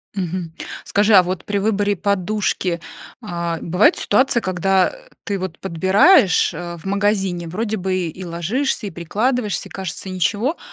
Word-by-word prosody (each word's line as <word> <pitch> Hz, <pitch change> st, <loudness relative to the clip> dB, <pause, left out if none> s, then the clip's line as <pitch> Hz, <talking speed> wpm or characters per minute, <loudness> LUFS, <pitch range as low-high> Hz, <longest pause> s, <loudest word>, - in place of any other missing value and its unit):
Мгм. 180 Hz, -3 st, -3 dB, 0.3 s
Скажи, 205 Hz, +2 st, +2 dB
а 190 Hz, -, +9 dB
вот 185 Hz, +1 st, -4 dB
при 205 Hz, -1 st, -1 dB
выборе 205 Hz, 0 st, +1 dB
подушки, 190 Hz, -2 st, -1 dB, 0.4 s
а, 170 Hz, -5 st, -3 dB
бывают 180 Hz, +5 st, +3 dB
ситуации, 240 Hz, +3 st, +2 dB
когда, 185 Hz, -1 st, +2 dB
э, -, -, -15 dB
ты 200 Hz, -2 st, -2 dB
вот 185 Hz, -3 st, -6 dB
подбираешь, 190 Hz, -, +4 dB
э, 170 Hz, +1 st, -6 dB
в 165 Hz, -, -15 dB
магазине, 195 Hz, -3 st, 0 dB
вроде 220 Hz, +6 st, -2 dB
бы 190 Hz, -1 st, -1 dB
и 180 Hz, +4 st, -8 dB
ложишься, 205 Hz, -, -2 dB
и -, -, -6 dB
прикладываешься, 210 Hz, +7 st, -1 dB
и -, -, -24 dB
кажется- 190 Hz, 0 st, -6 dB
ничего, 205 Hz, -, 0 dB
195 Hz, 150 wpm, -20 LUFS, 175-210 Hz, 0.4 s, а